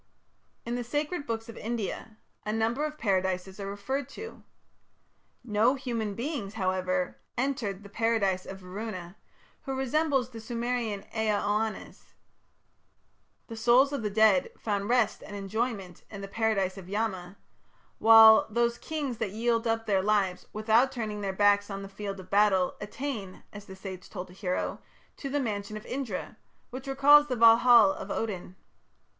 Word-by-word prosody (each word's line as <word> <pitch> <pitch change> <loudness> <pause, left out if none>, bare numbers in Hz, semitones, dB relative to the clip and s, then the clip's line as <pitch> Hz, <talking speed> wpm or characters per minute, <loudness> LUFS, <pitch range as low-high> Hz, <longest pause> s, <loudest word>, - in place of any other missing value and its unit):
In 235 - -3
the 245 0 -2
sacred 295 +5 -3
books 225 0 -3
of 230 - -9
India 220 -1 -4 0.3
a 210 - -2
number 225 +6 0
of 305 0 -5
Paradises 190 -3 -1
are 195 0 -4
referred 255 +7 -3
to. 450 +1 -9 1.0
No 225 +3 +2
human 230 -6 -3
beings, 235 -5 -4
however, 185 -2 -1 0.2
entered 235 -7 -2
the - - -10
Paradise 200 -3 0
of 195 - -7
Varuna, 185 -1 -7 0.5
who 270 -1 -3
resembles 270 -1 +1
the 225 -2 -8
Sumerian 235 -2 -2
Ea 220 -1 +1
Oannes. 215 +1 -3 1.3
The 230 - -8
souls 245 +5 +4
of 280 - -2
the 210 - -1
dead 210 -2 +4
found 205 -1 -2
rest 240 -4 +2
and 205 - -9
enjoyment 200 -2 -3
in 200 -2 -8
the 195 - -6
Paradise 200 -3 0
of 185 -1 -12
Yama, 200 -3 -3 0.6
while 220 0 +8
"those 235 +1 0
kings 285 -7 -4
that 210 -4 -2
yield 230 +1 0
up 225 0 0
their 195 -2 +2
lives, 195 -3 0
without 220 +5 +3
turning 215 -4 -4
their 195 -1 -1
backs 205 +1 +3
on 195 0 -5
the - - -7
field 195 0 -6
of 185 0 -12
battle, 200 -3 +3
attain", 210 -3 -5
as 205 -1 -9
the 190 - -10
sage 190 -1 -9
told 180 -2 -7
a - - -13
hero, 185 -1 -3 0.4
"to 275 - -5
the 290 +2 0
mansion 215 -4 -3
of 215 - -11
Indra", 245 -6 -5 0.3
which 260 +2 -7
recalls 290 +2 +6
the 255 - -1
Valhal 230 -2 +7
of 195 - -8
Odin. 190 -4 -4
220 Hz, 160 wpm, -28 LUFS, 195-240 Hz, 1.3 s, while